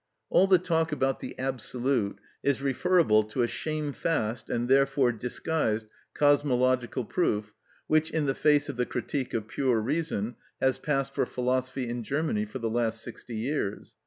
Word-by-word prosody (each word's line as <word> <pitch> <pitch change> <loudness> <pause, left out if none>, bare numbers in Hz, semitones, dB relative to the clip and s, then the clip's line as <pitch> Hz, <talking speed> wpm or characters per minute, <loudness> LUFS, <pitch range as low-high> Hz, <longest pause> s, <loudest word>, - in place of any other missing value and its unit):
All 190 - +5
the 190 -1 +6
talk 165 -2 0
about 135 -2 0
the - - -7
absolute 125 -4 -1 0.2
is 140 -2 +1
referable 140 -4 +3
to 110 +4 -1
a - - +2
shamefast, 150 -5 -2
and 120 0 -1
therefore 135 -1 +4
disguised 115 -1 -1 0.3
cosmological 130 -4 +2
proof, 105 -9 0 0.3
which, 155 0 +2
in 155 -2 0
the 135 - +1
face 145 +1 +3
of - - -5
the 125 - 0
"Critique 130 +1 -3
of 110 -2 -2
Pure 125 -1 +1
Reason," 125 -4 -2 0.2
has 130 -1 +2
passed 135 -2 -1
for - - 0
philosophy 130 0 -1
in 120 +1 -3
Germany 140 -4 -1
for 105 +5 -7
the 115 -3 -2
last 115 0 -1
sixty 120 - -8
years. 110 -3 -3
130 Hz, 160 wpm, -28 LUFS, 120-145 Hz, 0.3 s, the